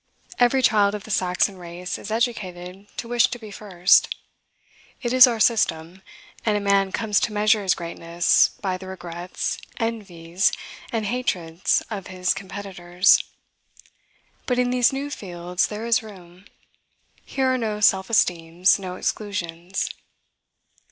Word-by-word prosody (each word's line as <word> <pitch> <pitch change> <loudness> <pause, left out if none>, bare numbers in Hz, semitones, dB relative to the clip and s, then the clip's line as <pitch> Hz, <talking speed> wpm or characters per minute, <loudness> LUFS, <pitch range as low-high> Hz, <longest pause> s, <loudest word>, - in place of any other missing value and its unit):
Every 255 +2 +3
child 205 -3 +3
of 205 - -7
the 220 - -9
Saxon 185 +1 +1
race 175 0 -6
is - - -8
educated 195 -5 -3
to 235 - -5
wish 240 0 +3
to 250 - -6
be 220 -3 -11
first. 190 -3 +3 0.9
It 240 0 -1
is 255 0 +9
our 235 -2 -1
system; 185 -6 +1 0.4
and 210 -2 +1
a - - 0
man 200 -1 +2
comes 210 -1 +1
to 260 -4 -1
measure 210 +1 +3
his 190 -2 +2
greatness 170 0 +2
by 185 -2 -1
the 190 - -10
regrets, 175 -1 -5 0.2
envies, 190 -6 -1 0.4
and 225 -2 -2
hatreds 185 -8 -1
of 200 -3 -5
his 185 -1 0
competitors. 190 -2 +1 1.2
But 250 - +1
in 250 0 +1
these 250 -1 +3
new 275 +2 -4
fields 180 -5 -2
there 215 +2 -6
is 235 +1 +2
room: 185 -3 -14 0.8
here 260 -1 0
are - - +1
no 215 -2 -2
self 190 -2 +3
esteems, 175 -3 +2
no 185 -2 -6
exclusions. 185 -3 -3
195 Hz, 140 wpm, -23 LUFS, 180-225 Hz, 1.2 s, is